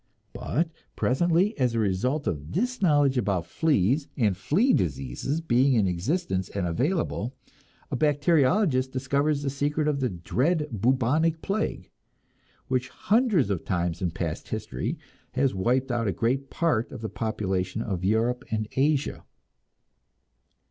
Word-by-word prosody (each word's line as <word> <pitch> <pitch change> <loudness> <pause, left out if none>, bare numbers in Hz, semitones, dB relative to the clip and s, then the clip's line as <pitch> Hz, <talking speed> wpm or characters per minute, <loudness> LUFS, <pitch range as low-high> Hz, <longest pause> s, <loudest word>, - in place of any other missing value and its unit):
But 165 +2 -1 0.2
presently, 175 - +2
as 125 -3 +2
a - - +1
result 115 +9 0
of 75 -3 -3
this 245 - -1
knowledge 145 -7 +3
about 95 -6 0
fleas 140 - +1
and 105 -7 +2
flea 190 - +2
diseases 70 - -1
being 135 -2 +3
in 110 -5 +3
existence 95 - -1
and 100 -3 -2
available, 130 - -1 0.6
a - - 0
bacteriologist 145 - +2
discovers 140 +3 0
the 140 - -1
secret 145 +2 0
of 145 -2 +1
the 130 -2 0
dread 145 - 0
bubonic 130 - +1
plague, 210 +2 -2 0.8
which 130 0 -1
hundreds 210 - +2
of 95 - -2
times 85 -2 -1
in 90 - +1
past 80 -1 -4
history 60 - -3 0.4
has 135 +1 +1
wiped 125 +7 +1
out 115 -2 0
a - - +2
great 130 +8 -1
part 150 -9 0
of - - -8
the 110 - -3
population 100 -3 -2
of 95 -4 -3
Europe 115 +5 +1
and 110 -1 -1
Asia. 145 +1 0
130 Hz, 140 wpm, -26 LUFS, 100-150 Hz, 0.8 s, knowledge